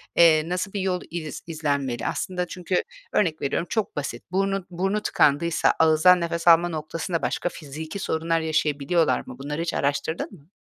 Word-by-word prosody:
eee, 160 -1 +5
nasıl 185 +3 -2
bir 200 - -2
yol 185 -1 -1
iz 160 -3 -5
izlenmeli? 140 -6 -2
Aslında 180 -2 -2
çünkü 180 +1 -1 0.3
örnek 165 -6 +1
veriyorum 145 +5 -1
çok 220 -2 -1
basit. 145 -1 -4
Burnu 195 0 0
burnu 195 +4 -1
tıkandıysa 160 -1 +2
ağızdan 160 +3 +5
nefes 170 0 -3
alma 170 +1 +7
noktasında 165 +2 -3
başka 175 - -1
fiziki 160 +5 -7
sorunlar 165 -1 0
yaşayabiliyorlar 155 -2 +1
mı? 125 - -9
Bunları 150 +4 -4
hiç 170 - -2
araştırdın 145 +6 -1
mı? 155 -6 -16
165 Hz, 160 wpm, -24 LUFS, 155-180 Hz, 0.3 s, alma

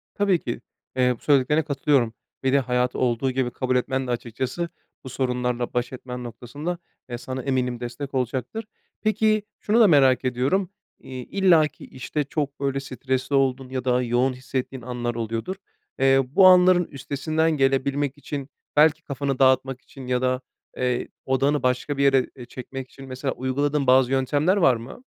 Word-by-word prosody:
Tabii 200 -4 +2
ki, 120 -4 -5 0.3
eee, 125 -1 +3
bu - - -29
söylediklerine 145 +2 +3
katılıyorum 140 -5 +1 0.3
ve 130 - +2
de 140 - +5
hayatı 125 -1 0
olduğu 125 +1 +1
gibi 125 -1 -1
kabul 130 +1 -1
etmen 130 +1 0
de - - -2
açıkçası 125 +8 -3 0.3
bu 130 - -7
sorunlarla 125 -1 -1
baş 125 +1 -1
etmen 125 -1 -7
noktasında, 140 +8 -5 0.3
eee, 120 - -4
sana 130 +1 -5
eminim 125 -3 -1
destek 125 +3 -6
olacaktır. 130 - -2 0.4
Peki, 215 -1 +2 0.2
şunu 215 +3 +2
da 220 - +8
merak 135 -5 +4
ediyorum, 130 +10 +1 0.3
iii, 130 -2 -8
illaki, 175 -6 +2
işte, 140 +4 -3
çok 140 0 -3
böyle 135 -1 -1
stresli 130 0 -2
olduğun 135 -1 +1
ya 130 -1 -4
da 125 0 +2
yoğun 125 +2 +1
hissettiğin 130 0 -4
anlar 120 -1 -3
oluyordur. 115 - -3 0.4
Eee, 135 0 +5
bu 185 +9 +6
anların 180 -1 +6
üstesinden 150 +4 -1
gelebilmek 140 0 +1
için 140 0 -6 0.3
belki 155 +2 +4
kafanı 140 -2 -3
dağıtmak 130 0 +3
için 135 -2 -12
ya 125 0 0
da, 130 0 0 0.4
eee, 125 -1 0 0.2
odağını 135 +2 +1
başka 130 +3 0
bir 140 - +2
yere, 135 -2 +4
eee, 125 - -9
çekmek 130 +1 -8
için, 135 -1 -12
mesela, 130 +1 -3
uyguladığın 140 +2 -1
bazı 130 0 +5
yöntemler 145 +8 +2
var 135 -10 +5
mı? 115 - -9
130 Hz, 165 wpm, -24 LUFS, 125-145 Hz, 0.4 s, da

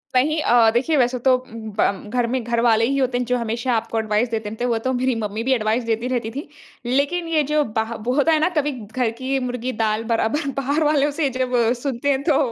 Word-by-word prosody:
नहीं 305 +5 +3
अ, 235 -4 +5
देखिए 265 +7 +1
वैसे 250 -1 +2
तो 260 -1 +6
उम, 240 -3 -11 0.2
ब 200 +1 0
घर 240 -1 +2
में 260 -2 -1
घरवाले 230 -1 +2
ही 275 +3 0
होते 260 -2 +1
हैं 250 - -1
जो 250 - +3
हमेशा 235 +2 -2
आपको 225 0 -1
एडवाइस 220 +2 0
देते 220 -2 -3
रहते 220 +3 -6
है। 245 - +1
वो 230 - +1
तो 260 - +1
मेरी 255 0 0
मम्मी 210 +2 -3
भी - - +5
एडवाइस 225 0 0
देती 225 +2 0
रहती 230 -3 -2
थी। 280 +6 -6 0.4
लेकिन 285 +8 0
ये 320 -2 +2
जो 300 0 +3
बाह 220 +1 -1
वो 250 - +2
होता 295 +3 +3
है 315 - +3
ना 315 - +2
कभी 295 0 +1
घर 225 +3 -2
की 265 +1 -1
मुर्गी 250 +1 -3
दाल 215 0 0
बराबर 235 +7 0
बाहर 285 +4 0
वालों 295 -1 +2
से 290 -4 +2
जब 255 -1 -1 0.3
सुनते 275 0 -2
हैं 275 0 +1
तो 295 -3 +3
250 Hz, 240 wpm, -21 LUFS, 230-275 Hz, 0.4 s, तो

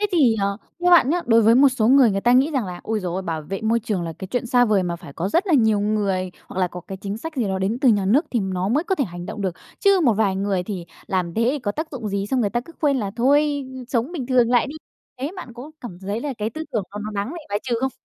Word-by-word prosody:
thế 415 - +2
thì, 275 -10 +4
ờ, 200 0 0 0.2
theo 355 0 +3
bạn 330 -7 +6
nhá, 350 +2 +1
đối 230 -1 +5
với 225 +2 +6
một 275 +3 +7
số 240 -4 +1
người 260 -3 +6
người 195 0 -1
ta 240 +4 +3
nghĩ 265 +5 +4
rằng 265 -8 -1
là 180 -1 -7
ôi 220 -1 -2
giời 180 -3 -3
ơi, 190 - -2
bảo 165 -3 -3
vệ 190 +6 -5
môi 230 +1 +2
trường 210 -5 -2
là 165 -1 -4
cái 190 - -7
chuyện 245 -1 -1
xa 245 0 +4
vời 210 -4 +2
mà 175 -1 -2
phải 145 - -12
có 170 +6 -2
rất 345 - +1
là 345 - +3
nhiều 220 -6 +3
người 200 -3 0 0.2
hoặc 190 - -4
là 180 - +2
có 180 - -8
cái 190 +2 -8
chính 200 +1 -4
sách 320 +5 -7
gì 250 - +1
đó 190 0 -1
đến 200 +5 -1
từ 270 - +4
nhà 205 -4 +3
nước 265 - +3
thì 240 - +1
nó 190 -1 -2
mới 290 +9 +1
có 380 - 0
thể 285 - 0
hành 175 -3 -8
động - - -6
được, 185 -3 -1 0.3
chứ 395 -2 +4
một 240 - +5
vài 200 -2 +1
người 195 -1 0
thì 180 -2 -5 0.2
làm 180 -3 -1
thế 230 - +1
thì 295 - -2
có 215 -6 -2
tác 315 +5 -4
dụng 240 -7 -5
gì, 200 0 -2
xong 255 +4 0
người 205 -4 +1
ta 240 +2 0
cứ 335 - -14
khuyên 285 -3 +2
là 205 -6 -2
thôi 285 +3 +2 0.2
sống 250 +5 -1
bình 280 -9 -4
thường 245 -2 +3
lại 245 -2 +3
đi, 290 - -7 0.5
thế 280 +4 -2
bạn 255 -10 -8
có 255 +5 -9
cảm 185 -8 -8
thấy 200 +3 -3
là 280 +1 -3
cái 210 +1 -2
tư 315 +7 -6
tưởng 220 - 0
đó 205 - -6
nó 215 - -4
đáng 200 +2 -2
bị 345 - -6
bài 205 0 0
trừ 250 -2 -1
không? 265 - 0
225 Hz, 315 wpm, -22 LUFS, 195-265 Hz, 0.5 s, một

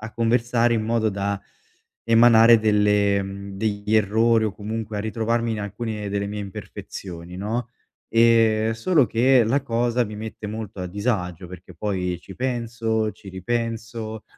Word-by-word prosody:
a 110 +1 -8
conversare 120 0 +2
in 110 - 0
modo 110 -1 +1
da 100 0 -2 0.6
emanare 115 0 +6
delle 105 -2 +2
mhmm, 100 0 -7
degli 105 0 -1
errori 110 +2 +3
o 105 - -3
comunque 110 +1 -5
a - - -1
ritrovarmi 115 +2 -1
in 110 - -3
alcune 105 0 -4
delle 100 0 -2
mie 105 +1 -5
imperfezioni 90 -2 -8
no. 110 +6 -3 0.4
Ehm, 115 -1 +4
solo 135 +5 +2
che, 125 +1 +4
la 130 +5 +1
cosa 120 -1 0
mi 105 -1 -8
mette 110 0 -7
molto 110 -2 -6
a 90 - -4
disagio, 90 -3 -2
perché 90 0 -12
poi 90 -4 -2
ci 95 - -12
penso, 115 -2 -1
ci 100 - -14
ripenso, 115 +2 -4
110 Hz, 150 wpm, -23 LUFS, 100-115 Hz, 0.6 s, emanare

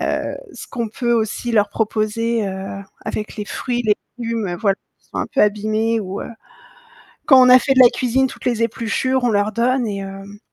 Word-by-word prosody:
heu, - - -2 0.2
ce - - -9
qu'on 235 -3 -3
peut 240 +2 -1
aussi 230 +1 -1
leur 210 -2 +3
proposer, 220 +1 -1
heu, 195 +1 -5 0.2
avec 210 +2 -4
les 210 - -4
fruits, 240 +3 -3
les 210 -1 +4 0.2
légumes, 230 -6 -2
voilà, 195 +1 +1 0.2
qui - - -34
sont - - -5
un - - -1
peu - - -1
abîmés 215 +2 +1
ou, 195 0 -5
heu, - - -8 1.0
quand 265 -2 +7
on - - +5
a 255 0 +9
fait 270 - +1
de 260 - +2
la 245 - +8
cuisine 260 +2 +1
toutes - - -11
les 235 -2 +1
épluchures, 235 +3 -1
on 245 - +3
leur 205 -1 +1
donne 245 +3 +1
et 205 -2 -3
hem 195 +1 -9
225 Hz, 205 wpm, -20 LUFS, 205-240 Hz, 1.0 s, a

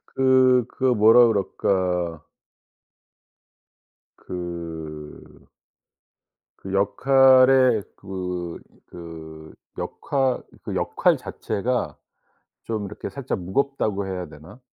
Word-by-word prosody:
그 130 -2 +4
그 - - -10
뭐라 115 +2 +6
그럴까 90 -5 -1 1.9
그 80 -4 -8 1.1
그 95 - -8
역할에 130 +3 +5
그 90 -3 -5 0.3
그 80 -2 -11 0.3
역할 135 -3 -1 0.2
그 - - -6
역할 - - +1
자체가 125 +5 -3 0.7
좀 110 -2 -3
이렇게 100 - -7
살짝 135 -6 -4
무겁다고 100 +1 -1
해야 90 -2 -5
되나? 75 - -14
95 Hz, 145 characters per minute, -23 LUFS, 85-125 Hz, 1.9 s, 뭐라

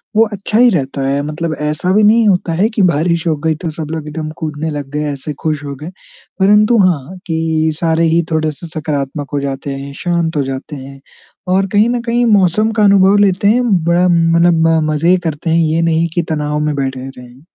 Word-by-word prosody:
वो 225 +1 +5
अच्छा 205 +2 -2
ही 245 +1 +6
रहता 140 - -2
है। 140 +1 0
मतलब 155 +2 -4
ऐसा 150 +4 -1
भी 210 +2 +3
नहीं 220 +2 +4
होता 180 -4 +1
है 195 +7 +1
कि 210 - +1
बारिश 170 0 +1
हो 160 - +2
गई 160 -1 +2
तो 165 - -2
सब 155 0 -6
लोग 160 -2 -5
एकदम 155 +1 -5
कूदने 155 -1 -4
लग 145 -2 -6
गए, 150 +1 -2
ऐसे 140 +2 -6
खुश 155 -2 -2
हो 140 -1 -6
गए। 150 +5 -8 0.5
परंतु 210 +4 +4
हाँ, 175 +1 -2
कि 160 -1 0
सारे 165 0 +1
ही 170 - +3
थोड़े 155 -1 0
से 160 +3 -11
सकारात्मक 145 -2 -3
हो 145 - 0
जाते 140 0 -4
हैं, 140 +1 -7
शांत 170 -2 -1
हो 145 - +1
जाते 135 +3 -6
हैं 135 0 -10 0.5
और 195 +1 +2
कहीं 205 +4 +2
ना 245 0 -1
कहीं 240 +1 +1
मौसम 210 0 +2
का 220 -1 +1
अनुभव 200 0 +5
लेते 200 -1 +2
हैं। 240 +4 +3 0.2
बड़ा 175 +1 +3
मतलब 165 -1 +3 0.2
मज़े 165 +4 +2
करते 160 0 -3
हैं, 165 - +2
ये 160 +2 0
नहीं 165 0 +1
कि 175 - +2
तनाव 150 -1 -2
में 150 -1 -1
बैठे 135 -1 -3
रहें। 125 +1 -14
160 Hz, 210 wpm, -15 LUFS, 150-185 Hz, 0.5 s, ही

